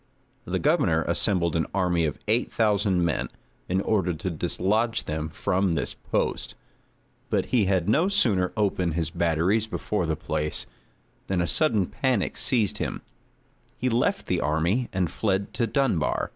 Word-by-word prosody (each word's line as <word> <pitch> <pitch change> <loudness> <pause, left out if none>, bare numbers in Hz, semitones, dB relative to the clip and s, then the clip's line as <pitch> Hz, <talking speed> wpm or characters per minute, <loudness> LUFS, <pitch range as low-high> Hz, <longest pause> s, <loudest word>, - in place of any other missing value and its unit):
The - - -1
governor - - +2
assembled 85 -5 +1
an 80 - 0
army 90 -3 +2
of 75 - -2
eight 115 +4 +1
thousand 100 -5 +2
men, 80 - -1 0.4
in 95 +2 +1
order 95 -5 0
to 90 +4 -4
dislodge 100 +8 0
them 75 0 -3
from 90 +3 0
this - - -2
post; - - -2 0.7
but - - +1
he 115 -5 +4
had 95 -3 +1
no 155 - +3
sooner 110 - +2
opened 95 -6 0
his 80 -2 -1
batteries 85 +7 +1
before 105 -4 -2
the 80 - 0
place, 75 0 0 0.6
than 95 -2 0
a 85 - +2
sudden 110 - +2
panic 115 0 -1
seized 115 -7 +1
him; - - -3 0.7
he 130 - 0
left 130 - 0
the 90 -2 0
army, 85 +11 0
and 90 -3 -1
fled 100 -2 -1
to 115 - 0
Dunbar. 120 - 0
95 Hz, 155 wpm, -26 LUFS, 85-110 Hz, 0.7 s, he